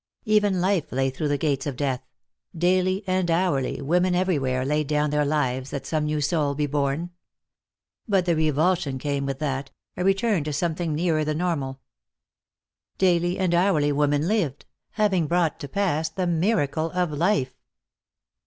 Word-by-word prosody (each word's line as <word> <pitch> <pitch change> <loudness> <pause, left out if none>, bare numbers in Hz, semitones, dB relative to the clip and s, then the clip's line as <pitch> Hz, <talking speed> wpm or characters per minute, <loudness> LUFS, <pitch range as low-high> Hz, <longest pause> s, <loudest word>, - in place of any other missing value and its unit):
Even 205 -4 +2
life 185 -3 0
lay 135 +1 0
through 150 +4 -3
the 145 0 +1
gates 140 -1 -1
of 140 - -3
death; 130 -2 -1 0.6
daily 185 +3 +2
and 185 -1 0
hourly 165 -6 +1
women 180 +5 +2
everywhere 135 -9 0
laid 150 +1 0
down 150 0 +1
their 150 0 +2
lives 135 -3 -1
that 140 -1 -5
some 155 0 -1
new 150 0 -1
soul 145 -1 0
be 150 +1 0
born. 145 +4 -1 1.0
But 195 -4 +2
the 170 -2 +2
revulsion 155 -2 +1
came 140 +1 -2
with 135 -1 -3
that, 135 -2 -3 0.3
a 180 - -2
return 195 -2 +2
to 150 - -3
something 165 +1 -1
nearer 160 -1 +1
the 155 0 -1
normal. 145 -6 -2 1.2
Daily 175 -1 +2
and 185 -3 +1
hourly 170 -5 +3
women 145 +1 +1
lived, 180 - -1 0.3
having 195 -7 +1
brought 170 -1 +1
to 145 - -6
pass 160 -2 0
the 180 +3 -2
miracle 165 -3 +1
of 180 -3 +1
life. 150 -4 +1
155 Hz, 160 wpm, -24 LUFS, 145-180 Hz, 1.2 s, hourly